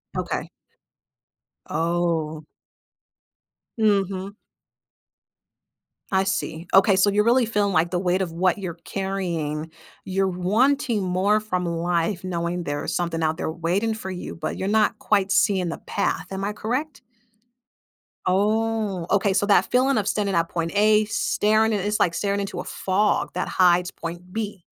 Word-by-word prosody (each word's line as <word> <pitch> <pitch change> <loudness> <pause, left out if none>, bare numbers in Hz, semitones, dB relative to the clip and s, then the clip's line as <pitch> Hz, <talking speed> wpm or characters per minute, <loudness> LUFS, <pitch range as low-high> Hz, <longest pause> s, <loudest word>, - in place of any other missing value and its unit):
Okay. - - -3 1.2
Oh. 165 -2 -1 1.3
Mhm. 200 -3 +1 1.8
I 190 0 +2
see. 175 -3 -3
Okay, 195 0 +6
so 195 +2 +4
you're 210 +1 +2
really 240 +1 +4
feeling, 205 -3 0
like, 165 +1 +2
the 180 - 0
weight 185 +1 +1
of 175 -3 -2
what 180 +4 +1
you're 180 -4 -5
carrying 170 -6 -3 0.3
you're 190 +1 0
wanting 215 +6 +1
more 190 +3 +2
from 185 -4 -2
life 170 +2 -1
knowing 175 0 -2
there's 145 -2 -3
something 170 -2 -1
out 160 +1 0
there - - -2
waiting 180 +7 -1
for 190 -3 -6
you, 180 - -6
but 160 - -4
you're 190 - -2
not 215 0 +2
quite 200 -2 +1
seeing 185 -1 +2
the 165 - -4
path. 160 - -2
Am 195 0 -4
I 205 - -1
correct? 255 +8 -3 1.3
Oh, 210 -1 0
okay. 200 0 +3
So, 200 +1 +2
that 190 -2 +5
feeling 260 +1 +3
of 205 -2 0
standing 200 -2 0
at 165 0 +2
point 165 -1 -2
A 210 +1 +5
staring 215 +1 +1
i - - +2
it's 205 +2 -1
like 170 - +2
staring 200 +3 -1
into 200 -1 -4
a - - -7
fog 200 +2 0
that 180 - -2
hides 180 -1 +3
point 175 +2 -8
B. 205 -3 -4
190 Hz, 150 wpm, -24 LUFS, 175-210 Hz, 1.8 s, Okay